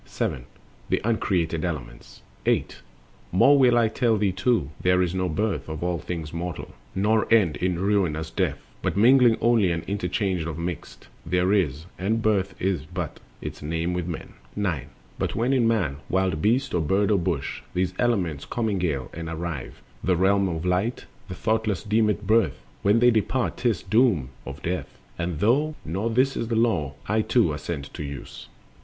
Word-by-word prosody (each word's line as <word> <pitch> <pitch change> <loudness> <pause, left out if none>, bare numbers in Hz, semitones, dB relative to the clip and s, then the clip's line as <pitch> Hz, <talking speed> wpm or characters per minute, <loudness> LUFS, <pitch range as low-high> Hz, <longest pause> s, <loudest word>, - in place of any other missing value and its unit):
7. - - -3 0.4
The - - +2
uncreated 90 -7 0
elements. 65 -9 -6 0.2
Birth - - -14
and - - +3
Death. - - -28
8. - - -16 0.6
More 140 +8 +6
will 125 -2 +5
I 115 -1 +4
tell 115 0 +1
thee 100 -2 +2
too: 95 - +1
there 90 0 +3
is 90 -1 +1
no 95 -1 0
birth 100 +1 -1
Of 80 +1 -4
all 90 -1 0
things 80 -2 -5
mortal, 85 -1 -5 0.2
nor 110 +4 +2
end 95 -10 +4
in 90 +1 0
ruinous 90 -5 0
death; - - 0 0.2
But - - -1
mingling 120 +1 +6
only 115 -5 +4
and 85 -1 -2
interchange 95 -2 -1
of 80 -2 -4
mixed 85 0 -6 0.2
There 90 +3 +1
is, 80 -6 +1
and 105 +5 +1
birth 100 -3 +1
is 90 -6 -1
but 90 -2 -5 0.2
its - - -6
name 80 +3 -2
with 90 -1 -2
men. 85 - -6 0.2
9. 90 -10 -1 0.3
But - - -1
when 120 +4 +1
in 125 -4 +3
man, 90 -12 +1
wild 95 -4 +1
beast, 120 +6 +2
or 90 - +2
bird, 95 +7 +2
or 100 - +4
bush, 85 -5 -2
These 90 0 0
elements 90 - 0
commingle 90 - -1
and 85 0 -5
arrive 80 -4 -5 0.2
The 90 -2 +2
realms 95 +1 +3
of 80 - -5
light, 95 +7 0 0.2
the 90 - -6
thoughtless 110 -1 0
deem 110 0 +2
it 105 0 -2
"birth"; 110 +3 +2 0.2
When 100 +3 +4
they 120 0 +6
dispart, 120 +3 0
'tis 115 -9 0
"doom 110 - +3 0.2
of 70 +1 -8
death;" 90 +2 -3 0.2
and 85 -3 -2
though 145 - +2
Not 100 +8 -2
this 135 +2 +3
the 115 0 -2
Law, 95 - +1
I 110 +2 +2
too 110 -8 +2
assent 75 -1 -5
to - - -6
use. 70 -1 -8
10. - - -23
95 Hz, 185 wpm, -25 LUFS, 85-110 Hz, 0.6 s, More